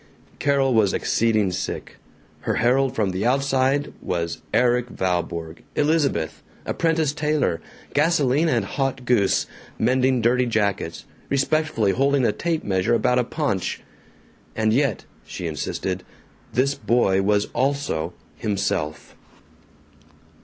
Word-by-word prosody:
Carol 135 -2 +2
was 110 -4 +3
exceeding 110 -4 +1
sick. 90 - -5 0.4
Her - - -2
herald 130 +3 +2
from 105 -4 +1
the 95 +2 -2
outside 135 +2 +1
was 85 -2 -3
Erik 125 0 +2
Valborg, 85 -4 -2
"Elizabeth." 145 - +1 0.2
Apprentice 160 -3 +1
tailor! 150 - 0 0.3
Gasoline 150 0 +3
and 115 -8 +1
hot 135 +2 -2
goose! 110 -6 +2 0.3
Mending 130 +2 +2
dirty 125 +2 +2
jackets! 100 -7 -1 0.2
Respectfully 140 -6 +1
holding 135 +3 +2
a - - +3
tape 170 -2 -2
measure 95 +4 +1
about 125 +2 +2
a - - +3
paunch! 125 - -2 0.7
And 110 0 +2
yet, 135 -1 +1 0.2
she 90 - -7
insisted, 80 -3 -3 0.5
this 135 +3 +2
boy 120 -8 +2
was 100 +1 +2
also 130 - -1 0.2
himself. 100 -8 -2
125 Hz, 115 wpm, -23 LUFS, 100-140 Hz, 0.7 s, was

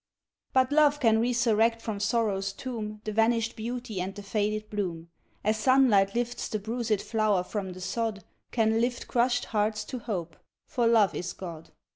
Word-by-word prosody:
But 260 +1 +3
love 295 -1 +4
can 225 -4 +4
resurrect 230 -1 +2
from 220 -3 -4
sorrow's 205 -3 0
tomb 215 -3 -6
The 215 - -3
vanished 225 +1 +2
beauty 230 -3 -4
and 190 +2 -4
the 205 - -8
faded 215 +1 -1
bloom, 170 -5 -3 0.3
As 215 +1 +2
sunlight 220 -5 +4
lifts 240 0 -2
the 215 - -2
bruised 220 0 -1
flower 215 -5 +1
from 190 -1 -4
the 185 - -10
sod, 220 +1 -2 0.3
Can 225 -1 +2
lift 245 0 -1
crushed 245 0 +1
hearts 215 0 +1
to 255 - -5
hope, 180 -8 -4 0.3
for 240 -3 +1
love 220 -4 +4
is 175 - -4
God. 165 -3 -8
220 Hz, 165 wpm, -28 LUFS, 200-235 Hz, 0.3 s, love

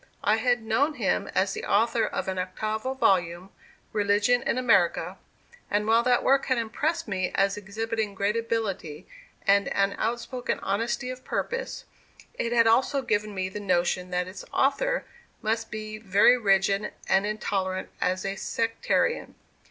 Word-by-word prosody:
I 215 +2 +3
had 245 0 +1
known 275 +8 +1
him 220 -8 0
as 195 0 +2
the - - -5
author 230 +2 +2
of - - -4
an 190 -1 -2
octavo 215 +7 -3
volume, 180 -5 +1 0.4
"Religion 205 +4 +2
in 240 - -1
America"; 195 -6 +2 0.5
and 210 +1 +1
while 225 +2 +4
that 245 0 +2
work 275 0 +3
had 260 - +2
impressed 295 +9 -1
me 185 -3 -1
as 195 0 +2
exhibiting 215 +1 -3
great 200 +2 0
ability 210 -8 -3 0.4
and 200 0 +4
an 200 0 +1
outspoken 240 +2 -2
honesty 235 +5 -1
of 255 0 -9
purpose, 475 - -3 0.5
it 235 - -2
had 235 -1 +4
also 265 +4 +3
given 210 -3 -1
me 185 -1 -1
the 190 +2 -6
notion 180 -1 0
that 180 0 -1
its 185 - -8
author - - +1 0.4
must 225 +1 -1
be 215 0 -6
very 210 +3 +5
rigid 200 -2 +1
and 195 +2 +3
intolerant 190 -3 -2
as 185 +1 0
a 195 0 -2
sectarian. 230 - -1
215 Hz, 150 wpm, -26 LUFS, 195-235 Hz, 0.5 s, very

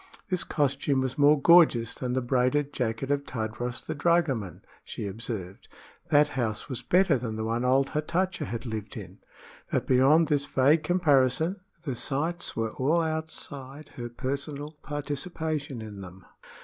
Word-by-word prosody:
This 185 - +1
costume 140 -2 0
was 130 +1 -3
more 145 +1 +6
gorgeous 140 -8 +5
than 125 -1 -3
the 130 0 0
braided 130 +3 +1
jacket 125 +2 -2
of 140 0 +1
Tadros 120 0 -4
the 160 - -3
dragoman, 140 - 0 0.2
she - - -6
observed; 100 -2 -6 0.4
that 150 0 +5
house 115 -6 -2
was 130 -4 -5
better 180 -7 +3
than 115 -2 -4
the 110 - -3
one 115 +2 -1
old 135 +2 +3
Hatatcha 170 +2 -1
had 115 -2 -5
lived 110 -3 -5
in. - - -9 0.5
But - - 0
beyond 140 +6 +5
this 145 -1 +1
vague 145 +5 +4
comparison, 160 0 +2 0.3
the 135 -6 -3
sights 160 +8 -2
were 115 -1 -1
all 150 +6 +2
outside 155 -3 -5
her 120 -1 -7
personal 140 +4 -4
participation 145 -2 -4
in 105 -2 -8
them. 95 0 -11
135 Hz, 150 wpm, -27 LUFS, 120-155 Hz, 0.5 s, more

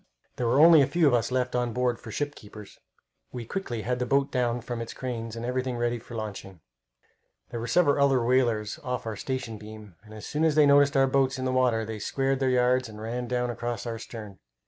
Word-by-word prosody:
There 120 - -1
were 125 +4 +3
only 160 -1 +8
a 135 - +3
few 170 -2 +2
of 140 - +4
us 120 -2 +1
left 125 -1 -1
on 120 -1 0
board 125 -1 0
for - - -11
ship 145 0 -3
keepers. 105 -3 -13 0.5
We 120 -2 -6
quickly 120 - -4
had 125 +1 -1
the 125 - -1
boat 140 +1 +1
down 120 -2 0
from 120 -1 -5
its 115 - -7
cranes, 115 -3 -5
and 115 0 -5
everything 125 0 -2
ready 120 0 -1
for 120 +1 -11
launching. 100 -4 -6 0.9
There 120 - -4
were 115 - -4
several 145 0 +3
other 135 -4 +3
whalers 120 -4 +1
off 125 -2 -3
our 110 -1 -4
weather 125 -4 -3
beam, 105 -4 -12
and 110 - -16
as 110 - -9
soon 150 +2 -2
as 160 -2 +3
they 150 -1 +6
noticed 140 0 +5
our 135 - +5
boats 135 -1 +1
in 130 - -3
the 130 - 0
water 120 -3 +2
they 110 0 -6
squared 135 +5 -1
their 135 -1 +1
yards 125 0 +2
and 105 -1 -10
ran 120 +3 -4
down 125 0 -1
across 120 -1 -4
our 115 -1 -4
stern. 105 -5 -9
125 Hz, 235 wpm, -27 LUFS, 115-130 Hz, 0.9 s, only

